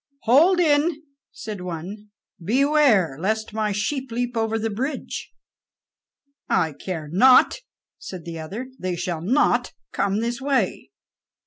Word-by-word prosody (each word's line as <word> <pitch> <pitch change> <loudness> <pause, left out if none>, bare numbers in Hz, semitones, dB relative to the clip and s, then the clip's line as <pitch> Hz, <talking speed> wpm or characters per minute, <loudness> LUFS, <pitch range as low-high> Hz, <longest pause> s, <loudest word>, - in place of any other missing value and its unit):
"Hold 320 +10 +5
in," 310 -1 +2 0.3
said 210 -4 -7
one; 180 +5 -7 0.3
"beware 245 - +3
lest 220 +4 -2
my 215 -1 -1
sheep 255 +6 -2
leap 245 +1 -2
over 225 0 0
the 225 0 -2
bridge." 260 +8 -4 1.2
"I 160 -2 +1
care 160 0 -6
not," 255 - +5 0.4
said 180 -4 -8
the 165 -1 -6
other; 215 +12 -7
"they 185 -1 -2
shall 175 -2 -3
not 250 - +1 0.2
come 200 +1 0
this 235 +2 -3
way." 275 -1 -1
220 Hz, 125 wpm, -23 LUFS, 185-265 Hz, 1.2 s, Hold